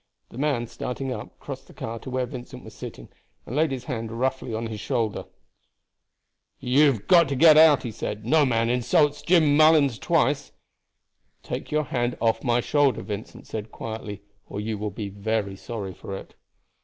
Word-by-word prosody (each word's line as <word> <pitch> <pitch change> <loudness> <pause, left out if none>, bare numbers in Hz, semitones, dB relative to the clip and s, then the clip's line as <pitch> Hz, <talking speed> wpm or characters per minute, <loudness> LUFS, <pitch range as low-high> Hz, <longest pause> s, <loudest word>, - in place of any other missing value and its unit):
The 120 - -10
man, 140 -5 0
starting 125 +3 -4
up, 105 - -8
crossed - - -8
the - - -16
car 115 +1 -5
to 130 - -9
where 130 0 -1
Vincent 125 +1 -9
was 110 - -11
sitting - - -9 0.4
and 125 - -6
laid 155 +1 +3
his 130 -2 -4
hand 115 -4 -4
roughly 130 +1 -2
on 110 +1 -3
his 110 -2 -5
shoulder. 115 -5 -2 1.3
"You 140 +5 +4
have 110 - -9
got 170 -5 +6
to 140 - -1
get 155 +3 +7
out!" 155 -2 +7
he 120 - -4
said. 105 0 -5
"No 155 +5 +4
man 115 -4 +2
insults 145 +5 +2
Jim 160 -5 +4
Mullens 155 -5 +5
twice." 150 -4 +1 0.9
"Take - - -5
your 155 0 +2
hand 120 -3 -2
off 115 -1 +1
my 120 -1 +2
shoulder," 145 -3 +2
Vincent 105 +1 -7
said 110 0 -6
quietly, 105 -3 -6 0.2
"or - - -6
you 110 +1 -2
will 105 0 -2
be 100 0 -6 0.4
sorry 100 -2 -6
for 95 +1 -7
it." - - -12
125 Hz, 180 wpm, -25 LUFS, 110-145 Hz, 1.3 s, get